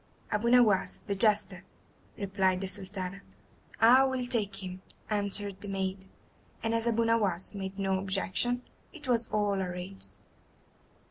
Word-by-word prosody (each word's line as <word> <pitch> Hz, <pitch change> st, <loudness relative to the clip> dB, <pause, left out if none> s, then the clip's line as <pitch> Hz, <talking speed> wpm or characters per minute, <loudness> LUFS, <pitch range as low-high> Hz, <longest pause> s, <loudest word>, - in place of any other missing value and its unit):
"Abu 220 Hz, +2 st, +1 dB
Nowas, 235 Hz, -6 st, +4 dB
the 200 Hz, -, -1 dB
jester," 200 Hz, -2 st, +3 dB, 0.5 s
replied 190 Hz, -2 st, +1 dB
the 195 Hz, -, -2 dB
Sultana. 190 Hz, 0 st, -4 dB, 0.6 s
"I 250 Hz, +4 st, +7 dB
will 260 Hz, -1 st, -1 dB
take 205 Hz, -5 st, -1 dB
him," 185 Hz, 0 st, -7 dB, 0.3 s
answered 200 Hz, -1 st, 0 dB
the 205 Hz, -, -5 dB
maiden; 190 Hz, -1 st, -3 dB, 0.5 s
and 225 Hz, 0 st, 0 dB
as 230 Hz, 0 st, +1 dB
Abu 230 Hz, 0 st, +2 dB
Nowas 205 Hz, -6 st, +1 dB
made 195 Hz, -1 st, -5 dB
no 195 Hz, -1 st, 0 dB
objection, 195 Hz, +6 st, -1 dB, 0.3 s
it 300 Hz, -6 st, -11 dB
was 235 Hz, -2 st, +1 dB
all 205 Hz, -2 st, 0 dB
arranged. 180 Hz, +1 st, -6 dB
200 Hz, 135 wpm, -30 LUFS, 190-225 Hz, 0.6 s, I